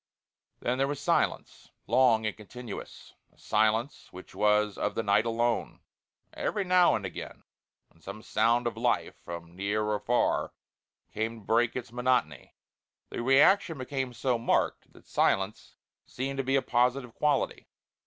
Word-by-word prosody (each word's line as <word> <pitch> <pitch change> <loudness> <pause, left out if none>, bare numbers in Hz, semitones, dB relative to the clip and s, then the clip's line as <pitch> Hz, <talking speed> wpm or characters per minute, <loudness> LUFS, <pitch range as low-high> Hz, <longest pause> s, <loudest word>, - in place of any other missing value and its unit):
Then 125 +2 -1
there 135 - +2
was 145 0 -3
silence, 145 - -1 0.2
long 115 -4 +3
and 110 - -2
continuous. 110 +1 -10 0.2
A - - -32
silence 110 +5 0
which 90 - -12
was 105 -1 +2
of - - -2
the 115 - -1
night 105 +2 +2
alone; 115 0 -1 0.5
every 205 - -2
now 180 -1 +4
and 100 - -3
again 95 - -8 0.5
when 80 - -27
some 100 +5 -9
sound 115 +3 +2
of 120 -2 -2
life 120 +2 0
from 85 0 -8
near 100 +3 -1
or 105 0 -1
far 120 +3 0 0.6
came 110 +1 -3
to - - -20
break 120 +1 +2
its 120 -2 -5
monotony 125 - -1 0.6
the - - -4
reaction 145 +7 +4
became 130 0 -3
so 120 0 -1
marked 115 - 0
that - - -19
silence 95 +2 0 0.3
seemed 135 +2 -4
to 135 - 0
be 135 +1 +1
a 135 - +2
positive 125 0 +1
quality. 150 -1 0
120 Hz, 155 wpm, -29 LUFS, 105-130 Hz, 0.6 s, now